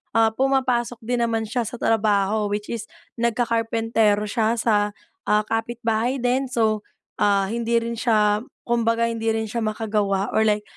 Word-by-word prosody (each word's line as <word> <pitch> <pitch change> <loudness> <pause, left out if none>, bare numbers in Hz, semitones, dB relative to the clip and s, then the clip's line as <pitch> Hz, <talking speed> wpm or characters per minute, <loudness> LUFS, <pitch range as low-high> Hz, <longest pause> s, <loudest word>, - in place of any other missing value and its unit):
ah, 225 -1 +4
pumapasok 255 -2 0
din 245 +2 -1
naman 225 -1 0
siya 235 0 -2
sa - - -6
trabaho, 210 -2 +1
which 205 +2 -3
is 225 -2 -4 0.3
nagka-karpentero 225 -2 +1
siya 220 +2 0
sa, 210 -2 +1 0.3
ah, 210 0 +3
kapitbahay 230 +2 -1
din. 255 +2 0
So, 220 -4 +1 0.4
ah, 200 -1 +3
hindi 235 +2 -1
rin 230 0 -1
siya, 210 -3 +2 0.2
kumbaga 230 -1 +1
hindi 225 0 -4
rin 220 0 -1
siya 235 - -2
makagawa 210 -3 -1
or - - +3
like, 210 0 +1
225 Hz, 150 wpm, -23 LUFS, 210-235 Hz, 0.4 s, ah